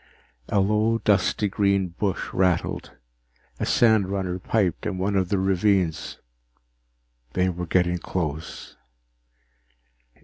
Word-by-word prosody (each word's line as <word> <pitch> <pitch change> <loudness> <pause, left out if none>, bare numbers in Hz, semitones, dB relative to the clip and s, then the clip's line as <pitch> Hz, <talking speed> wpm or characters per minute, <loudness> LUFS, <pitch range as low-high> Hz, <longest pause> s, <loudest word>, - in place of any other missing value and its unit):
_ - - -31 0.5
A 100 - +2
low, 105 +3 +2
dusty 105 -1 +1
green 100 -1 +1
bush 95 +2 -3
rustled. 90 -2 0 0.7
A - - -1
sandrunner 100 -5 +2
piped 95 -3 0
in 95 - -3
one 100 +2 -1
of 95 -2 +1
the 100 - +1
ravines. 95 -3 +1 1.2
They 95 0 +1
were 90 -1 -4
getting 90 0 +1
close. 80 -3 -5
95 Hz, 110 wpm, -24 LUFS, 90-100 Hz, 1.2 s, A